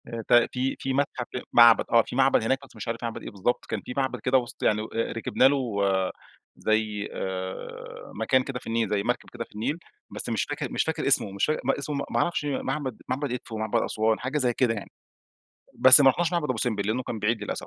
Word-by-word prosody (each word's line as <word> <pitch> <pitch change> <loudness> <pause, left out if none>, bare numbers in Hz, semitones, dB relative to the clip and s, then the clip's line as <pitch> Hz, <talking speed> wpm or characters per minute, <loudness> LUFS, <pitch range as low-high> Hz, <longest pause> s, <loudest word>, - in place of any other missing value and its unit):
آآ، 115 -1 -5
ت - - +2
تِ 120 +1 +4 0.2
في 135 - -2
متحف 135 -2 -1
ك - - -4
معبد 120 -1 +7
آه، 115 0 +6
في - - -8
معبد 135 -3 +3
هناك 130 +4 +1
بس - - -21
مش - - -8
عارف 115 +1 -4
معبد 115 -1 -4
إيه - - -7
بالضبط. 105 +5 -1
كان 110 -3 -4
في 125 - -7
معبد 130 -2 -1
كده 125 +4 +2
وسط 120 -2 -5
يعني 105 0 +2
أ 115 +1 -3
ركبنا 115 +3 +1
له، 130 -6 0 0.8
زي 110 -1 -1
آآ، 95 0 -6
مكان 130 +4 +2
كده 130 -1 -5
في - - -13
النيل، 115 -2 0
زي 105 -1 0
مركب 120 +2 -2
كده 120 -1 -4
في - - -21
النيل، 125 +9 -2 0.3
بس - - -5
مش - - 0
فاكر - - -5
مش - - +1
فاكر - - -2
اسمه، 100 - +3
مش 100 0 0
فاكر 155 - -1
م 135 - +2
اسمه 140 0 -3
ما - - +1
أعرفش 170 -3 -1
معبد 135 -3 -3
معبد 135 +1 -2
إدفو، 120 -2 -6
معبد 110 0 0
أسوان 110 0 0
حاجة 130 +4 -2
زي 125 -4 +1
كده 120 -2 +1
يعني. 105 - -7 0.8
بس 130 +2 +9
ما 135 -1 +7
رُحناش 175 +5 -1
معبد 170 -3 0
أبو 130 - -1
سمبل 110 -3 -1
لأنّه 115 +4 0
كان 115 - -5
بعيد 105 +1 0
للأسف. 105 - -5
120 Hz, 230 wpm, -26 LUFS, 110-135 Hz, 0.8 s, بس